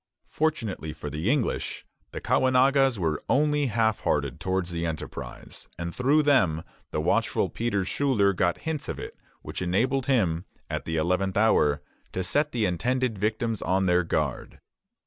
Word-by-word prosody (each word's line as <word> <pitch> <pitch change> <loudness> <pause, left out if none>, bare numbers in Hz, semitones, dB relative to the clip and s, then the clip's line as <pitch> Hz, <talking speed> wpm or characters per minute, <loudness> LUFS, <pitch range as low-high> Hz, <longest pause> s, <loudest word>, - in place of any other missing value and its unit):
Fortunately 110 - -1
for 75 -1 -7
the 80 +8 -1
English, 135 -3 -1 0.3
the - - -5
Caughnawagas 130 0 +3
were 80 -5 -1
only 150 0 +2
half 110 -2 +1
hearted 70 -4 -1
towards 95 -1 -1
the 85 -1 -3
enterprise; 80 -2 -6
and 85 -1 -4
through 140 +6 +3
them 90 - +3 0.3
the - - -2
watchful - - +1
Peter 105 -5 -1
Schuyler 105 -5 +2
got 90 -1 0
hints 160 -3 -3
of - - -3
it - - -7 0.3
which - - -5
enabled 125 +9 +1
him, 95 -10 +1 0.3
at - - -3
the 80 0 -2
eleventh 90 +4 0
hour, 75 -9 +3 0.3
to 95 - -1
set 145 +12 +1
the 115 -3 0
intended 115 +5 0
victims 110 +1 -1
on 95 +1 +1
their 90 0 +3
guard. 75 -5 -2
100 Hz, 155 wpm, -26 LUFS, 85-130 Hz, 0.3 s, Caughnawagas